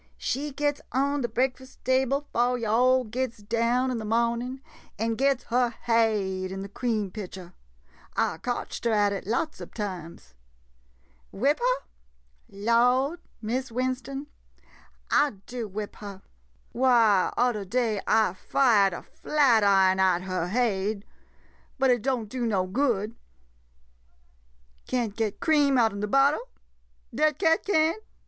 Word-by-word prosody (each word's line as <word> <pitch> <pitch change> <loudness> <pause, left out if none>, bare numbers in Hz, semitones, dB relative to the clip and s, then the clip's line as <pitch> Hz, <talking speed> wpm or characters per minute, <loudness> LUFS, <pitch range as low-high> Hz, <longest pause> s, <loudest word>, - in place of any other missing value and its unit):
She 290 +3 -2
gits 290 +1 -1
on 280 +2 0
de 240 - 0
breakfust 260 +3 -2
table 265 +2 +1
'fo' 245 +1 +2
yo' 230 -3 -2
all 255 +3 +4
gits 245 +1 -3
down 235 +4 0
in 240 - -2
de - - -5
mohnin', 235 +3 0 0.4
and 225 +1 -1
gits 270 +1 +1
her 245 +1 +2
haid 215 -6 0
in 195 0 -5
de - - -6
cream 215 -3 -2
pitcher. 185 -3 -8 0.6
I 160 - 0
cotched 245 -1 -4
her 230 - +2
at 205 -1 +3
it 195 - -6
lots 280 +8 -2
ob - - -10
times. 180 - -6 1.0
Whip 275 +9 +1
her? - - 0 0.6
Lawd 245 - +2
— - - -37
Miss 250 +3 -2
Win 255 +2 0
ston 270 +3 -7 0.5
— - - -27
I 295 - -2
do 240 -3 -5
whip 205 +1 -6
her. 200 -2 -9 0.5
Why, 230 -6 +4
udder 240 -4 +1
day 220 0 -1
I 220 -5 +3
fired 205 -2 +3
a - - -7
flatiron 200 -10 +3
at 185 -1 +3
her 185 -2 -2
haid 210 -1 -1 0.4
— - - -34
but 265 -1 +3
it 245 -2 +2
don't 250 -3 -1
do 240 +2 -3
no 195 -4 +1
good. 220 0 0 1.7
Can't 235 -5 -1
get 220 -3 -2
cream 290 -4 +3
out 225 -4 +3
'n 200 - -6
de 210 - -2
bottle! 275 +6 +2 0.6
Dat 305 -2 +2
cat 325 -3 +2
can't? 330 +1 +1
235 Hz, 145 wpm, -26 LUFS, 205-260 Hz, 1.7 s, all